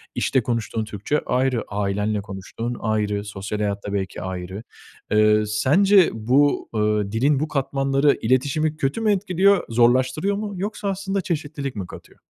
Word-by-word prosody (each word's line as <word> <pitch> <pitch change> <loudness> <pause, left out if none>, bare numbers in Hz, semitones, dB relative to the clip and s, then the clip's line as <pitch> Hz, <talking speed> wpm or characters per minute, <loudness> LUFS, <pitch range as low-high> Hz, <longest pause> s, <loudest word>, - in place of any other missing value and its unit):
işte 130 - +1
konuştuğun 115 -2 -2
Türkçe 105 +8 -2
ayrı, 125 -2 +1
ailenle 105 +1 -1
konuştuğun 110 +5 -6
ayrı, 105 -2 -1
sosyal 105 +1 -5
hayat 100 -1 -2
da 100 - -4
belki 95 -2 -3
ayrı. 95 +3 -6 0.5
Eee 105 0 +4
sence 175 - +4
bu, 130 +6 +2
ııı, 105 -1 +1
dilin 135 +5 +2
bu 155 - -1
katmanları 135 0 +1
iletişimi 145 +6 +1
kötü 140 +12 -1
mü 215 -2 +3
etkiliyor, 195 0 +3
zorlaştırıyor 130 - +2
mu 205 0 -4
yoksa 200 +2 -4
aslında 195 0 -2
çeşitlilik 145 -6 -4
mi 95 -3 -5
katıyor? - - -13
125 Hz, 145 wpm, -22 LUFS, 105-155 Hz, 0.5 s, Eee